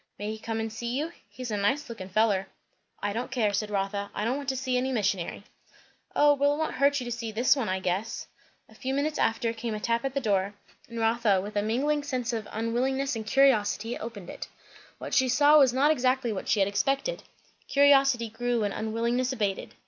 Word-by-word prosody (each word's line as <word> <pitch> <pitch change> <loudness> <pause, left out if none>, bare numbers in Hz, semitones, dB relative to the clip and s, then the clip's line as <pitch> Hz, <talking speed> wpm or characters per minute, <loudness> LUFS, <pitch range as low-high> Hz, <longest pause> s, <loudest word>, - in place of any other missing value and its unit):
"May 205 +1 -4
he 220 - -6
come 225 0 -3
and 225 0 -3
see 235 +2 -3
you? 310 +4 -2 0.2
He's 250 -3 -7
a 210 - -1
nice 235 +9 0
lookin' 195 -5 -8
feller." 195 -1 +2 0.6
"I 205 0 0
don't 240 +4 -3
care," 230 -5 0
said 210 +1 -1
Rotha. 200 0 -2
"I 210 - -1
don't 240 +3 +1
want 280 -1 -4
to 265 - -1
see 255 0 -1
any 255 +1 0
missionary." 200 -5 -1 0.7
"O 295 0 +6
well! 285 +1 +2
it - - -6
won't 315 0 -1
hurt 285 +1 +3
you 250 - -5
to 240 - -5
see 230 -1 -4
this 240 +6 +3
one, 250 -8 -2
I 190 0 0
guess." 185 +5 -2 0.4
A - - -19
few 260 +4 -3
minutes 300 +2 -1
after 230 0 +1
came 225 -1 -4
a - - -4
tap 230 +2 0
at 270 0 -3
the - - +2
door, 200 -4 0 0.3
and 230 0 -6
Rotha 225 -3 +2
with 205 +3 -6
a 205 - +2
mingling 280 +8 0 0.3
of 220 -2 -3
unwillingness 255 +5 -1
and 220 -1 -5
curiosity, 230 -3 +3
opened 210 -6 -7
it. - - -7 0.5
What - - -7
she 260 -2 +3
saw 295 +4 +6
was 265 -3 +5
not 275 +4 +3
exactly 255 -4 +1
what 190 - -5
she 210 - +3
had 195 - +3
expected; 275 - 0 0.5
curiosity 275 -4 +4
grew 240 +1 -1
and 205 - -1
unwillingness 235 +4 -1
abated. 205 -6 -2
235 Hz, 215 wpm, -27 LUFS, 210-265 Hz, 0.7 s, O